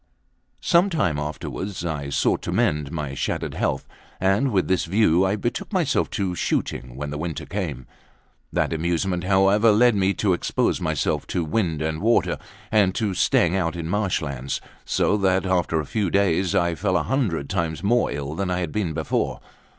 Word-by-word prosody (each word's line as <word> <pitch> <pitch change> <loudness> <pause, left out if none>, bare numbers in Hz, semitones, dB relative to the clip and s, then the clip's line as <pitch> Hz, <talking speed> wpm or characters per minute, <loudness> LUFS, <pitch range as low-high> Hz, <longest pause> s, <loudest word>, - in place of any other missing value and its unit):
Some 175 +3 +4
time 120 - 0
afterwards 85 +5 -5
I 75 -4 -3
sought 70 - +1
to - - -4
mend 75 -1 +1
my 75 -4 -4
shattered - - -2
health, - - -1 0.3
and 100 +8 +2
with 95 -4 +1
this 95 - +1
view 95 -1 +3
I 95 - +1
betook 120 - -3
myself 180 -8 +1
to 95 -3 -1
shooting 65 -6 -2
when 70 +1 -5
the 75 - -4
winter 80 -2 -4
came 90 -10 -3
in. - - -19 0.7
That - - 0
amusement, 85 +2 -1
however, 100 +3 +4
led 120 +3 +5
me 100 -1 +1
to 100 -3 +2
expose 85 - 0
myself - - -1
to 85 - -1
wind 80 -3 0
and 80 0 -2
water, 115 +2 +2 0.3
and 100 -3 +3
to 105 -4 0
staying 90 0 +2
out 85 -3 0
in 85 -2 -4
marsh 100 -3 0
lands; 70 -2 -3 0.3
so 105 - +2
that, 95 -1 +2
after 90 -3 +1
a 75 - -3
few 100 +4 -1
days, 95 -2 +2
I 85 0 +2
fell 95 +1 0
a 85 - 0
hundred 85 - -1
times 80 +1 -2
more 120 +4 +2
ill 70 0 -4
than 95 +2 -2
I 90 0 0
had 85 -3 -3
been 95 -5 -1
before. 80 0 -1
90 Hz, 185 wpm, -23 LUFS, 80-100 Hz, 0.7 s, led